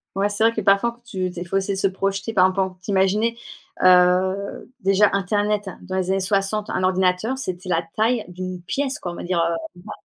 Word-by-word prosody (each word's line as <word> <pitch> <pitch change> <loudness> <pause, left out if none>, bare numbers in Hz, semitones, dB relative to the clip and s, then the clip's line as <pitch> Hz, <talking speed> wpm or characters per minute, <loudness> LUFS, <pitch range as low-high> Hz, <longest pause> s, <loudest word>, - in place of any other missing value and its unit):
Ouais 200 +1 +1
c'est 205 +1 -1
vrai 230 0 +4
que 220 - -2
parfois 200 +4 +3
faut 240 - -25
tu 190 -6 -3
tu 180 - -8
es - - -3
faut 180 +2 -1
essayer 195 0 -1
de - - -4
se 195 - +3
projeter, 195 +3 -2
par 185 -3 +5
exemple 185 +1 0
en 190 - 0
t'imaginer, 195 +4 +1 0.5
heu, 185 +4 +3
déjà 195 +2 +4
internet 205 +1 0
dans 185 - -6
les 185 -1 -1
années 195 0 +2
60, 200 +2 -1
un - - -1
ordinateur, 185 +6 +1
c'était 185 -7 -5
la 165 -1 +1
taille 225 +1 +1
d'une 180 0 -6
pièce 275 +7 -2
quoi, 175 - -5
on - - -8
va - - -7
dire, 180 0 -1
heu, 170 0 +1 0.3
vingt 215 - -9
195 Hz, 225 wpm, -22 LUFS, 185-210 Hz, 0.5 s, par